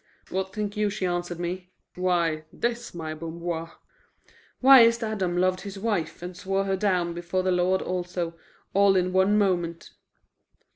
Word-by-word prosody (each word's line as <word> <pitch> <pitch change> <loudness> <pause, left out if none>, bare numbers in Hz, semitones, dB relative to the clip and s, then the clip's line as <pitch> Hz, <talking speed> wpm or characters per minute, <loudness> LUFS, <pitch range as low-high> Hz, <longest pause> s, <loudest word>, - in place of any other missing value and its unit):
What 190 +1 -2
think 210 -1 -3
you 210 0 +1
she 200 -2 -3
answered 175 -1 -2
me? 180 +1 -4 0.2
Why, 170 -4 0
this, 235 -3 -3
my 160 -2 -4
Bamboir: 165 +1 -5 0.9
'Why 265 0 +9
is't 230 0 +5
Adam 195 -5 -1
loved 185 +1 +2
his 200 0 -7
wife 195 -6 -2
and 180 0 -6
swore 195 +2 -1
her 195 0 +1
down 185 -3 0
before 175 +2 -2
the 185 - +1
Lord 180 +1 +2
also, 175 -2 -3 0.4
all 200 0 +5
in 185 0 +1
one 190 +3 +4
moment? 175 -4 0
185 Hz, 155 wpm, -26 LUFS, 175-200 Hz, 0.9 s, Why